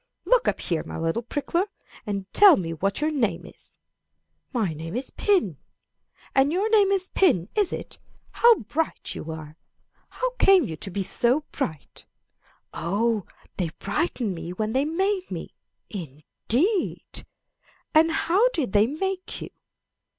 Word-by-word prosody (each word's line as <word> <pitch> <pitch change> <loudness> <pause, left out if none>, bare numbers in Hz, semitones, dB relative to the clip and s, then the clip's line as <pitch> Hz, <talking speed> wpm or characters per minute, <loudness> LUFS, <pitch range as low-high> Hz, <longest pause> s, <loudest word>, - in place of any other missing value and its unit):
"'Look - - +3
up - - 0
here, 165 -3 -1
my - - -7
little 165 +7 -1
prickler, 315 - -1 0.4
and 200 -2 -2
tell 400 -4 +8
me 165 -3 -3
what 195 - -1
your 305 +1 +1
name 225 - -1
is. - - -16 0.7
My 210 -9 0
name 165 +4 -7
is 255 +2 -4
pin. 350 - +1 0.8
Ah, 270 - +6
your 345 +10 +1
name 415 -3 +5
is 385 -1 +1
pin, 255 - +2
is 415 -4 +1
it? - - -6 0.3
How 470 0 +6
bright 305 +9 -3
you 160 - -7
are! 155 -1 -9 0.5
How - - -2
came 385 -3 +6
you 165 -10 -4
to 195 - -6
be 195 +1 -2
so 245 +9 +2
bright? 160 - -5 0.7
Oh, 210 +4 0 0.3
they 180 -4 -1
brightened 235 - -1
me 170 0 -6
when 215 +3 -2
they 270 +2 +2
made 375 +4 -1
me. - - -6 0.4
Indeed! 215 - -2 0.7
And 320 +1 +5
how 380 +9 +3
did 265 - -2
they 210 +1 +5
make 370 +6 -3
you? - - -8
250 Hz, 150 wpm, -25 LUFS, -, 0.8 s, tell